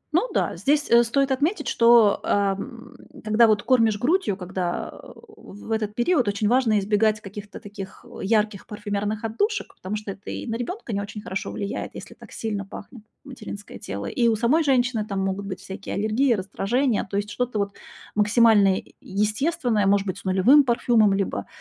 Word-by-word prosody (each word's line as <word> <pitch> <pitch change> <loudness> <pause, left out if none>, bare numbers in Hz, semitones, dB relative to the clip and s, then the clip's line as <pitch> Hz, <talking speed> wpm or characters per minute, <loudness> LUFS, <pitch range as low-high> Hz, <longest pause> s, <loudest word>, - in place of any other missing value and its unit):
Ну 455 +9 +2
да, - - 0
здесь, 290 +1 +1
э, 235 0 +8
стоит 270 +4 +1
отметить, 290 +10 0
что, 230 -3 +5
эм, 205 +4 -2 0.3
когда 220 +2 +4
вот 210 -1 +2
кормишь 225 -5 +3
грудью, 295 - +1
когда, 180 -1 -3
э, - - -14 0.3
в 205 - -11
этот 215 -1 -1
период 245 0 +2
очень 205 +1 0
важно 235 -3 +3
избегать 210 +1 +2
каких-то 205 0 -9
таких, 200 +1 -10
э, 240 - -9
ярких 210 -1 0
парфюмерных 210 +1 -3
отдушек. 325 - -1
Потому 190 +3 -5
что 210 -1 -5
это 195 +2 -10
и - - -5
на 225 - -3
ребёнка 245 - -5
не 200 - -1
очень 205 +1 -7
хорошо 190 0 -4
влияет, 200 -2 -5
если - - -9
так - - -15
сильно 210 -3 -3
пахнет 210 +4 -11 0.2
материнское 215 -7 -9
тело. 100 +1 -6
И 235 - +1
у 225 - +3
самой 245 +9 +2
женщины 250 -5 +2
там 200 -2 -4
могут 195 +1 -2
быть 190 -1 -6
всякие 195 0 -7
аллергии, 220 +6 +2
раздражения. 215 +5 0
То 200 - -2
есть 205 +1 -3
что-то 250 -3 -2
вот 200 -1 -1 0.4
максимально 210 -2 +4 0.2
естественное, 215 - 0
может 200 0 +3
быть, 190 0 -4
с - - -17
нулевым 195 +11 +5
парфюмом, 235 -4 +3
либо, 195 -1 -2
215 Hz, 180 wpm, -24 LUFS, 200-240 Hz, 0.4 s, э